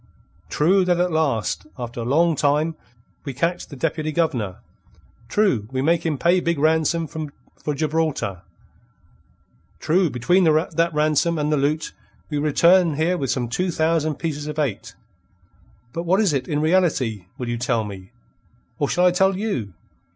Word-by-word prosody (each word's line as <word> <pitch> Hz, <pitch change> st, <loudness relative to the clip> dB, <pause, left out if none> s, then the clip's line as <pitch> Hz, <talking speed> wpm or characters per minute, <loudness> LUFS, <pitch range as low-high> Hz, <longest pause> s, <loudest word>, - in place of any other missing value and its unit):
True 185 Hz, +6 st, +3 dB
that 175 Hz, -1 st, +2 dB
at 180 Hz, 0 st, +1 dB
last, 145 Hz, -9 st, 0 dB
after 120 Hz, -1 st, -5 dB
long 160 Hz, +7 st, +2 dB
time, 150 Hz, +3 st, +1 dB, 0.5 s
we 140 Hz, -4 st, -6 dB
catch 170 Hz, +5 st, -1 dB
the 145 Hz, -, -10 dB
Deputy 155 Hz, +2 st, -2 dB
Governor; 130 Hz, -, -1 dB, 0.7 s
true, 135 Hz, -, +1 dB
we 130 Hz, 0 st, -1 dB
make 165 Hz, +2 st, +2 dB
him 155 Hz, -4 st, -1 dB
pay 170 Hz, +7 st, +3 dB
big 170 Hz, -2 st, -1 dB
ransom 160 Hz, +2 st, +2 dB
for 150 Hz, -1 st, -7 dB
Gibraltar; 150 Hz, -, -1 dB, 1.4 s
true 175 Hz, +2 st, +2 dB
between 175 Hz, +10 st, +2 dB
that 165 Hz, +1 st, +2 dB
ransom 155 Hz, +2 st, +1 dB
and 150 Hz, 0 st, 0 dB
the 150 Hz, -, +2 dB
loot 150 Hz, +3 st, -1 dB, 0.4 s
we 150 Hz, -, -1 dB
return 170 Hz, +3 st, +4 dB
here 165 Hz, +4 st, +1 dB
with 135 Hz, -7 st, -3 dB
some 120 Hz, -1 st, -1 dB
two 180 Hz, +11 st, -1 dB
thousand 160 Hz, -2 st, +1 dB
pieces 150 Hz, -2 st, -4 dB
of 150 Hz, 0 st, -5 dB
eight. 135 Hz, -10 st, -2 dB, 1.0 s
But 165 Hz, -, -3 dB
what 180 Hz, +3 st, +2 dB
is 200 Hz, -8 st, +2 dB
it, 135 Hz, -, -1 dB
in 150 Hz, -3 st, -1 dB
reality, 150 Hz, -, +1 dB
will 125 Hz, -, -5 dB
you 120 Hz, 0 st, -2 dB
tell 120 Hz, -2 st, 0 dB
me? 95 Hz, -1 st, -9 dB, 0.7 s
Or 145 Hz, -, 0 dB
shall 180 Hz, -, +2 dB
I 180 Hz, -, +6 dB
tell 190 Hz, +1 st, +2 dB
you? 130 Hz, -, -3 dB
155 Hz, 160 wpm, -22 LUFS, 135-170 Hz, 1.4 s, I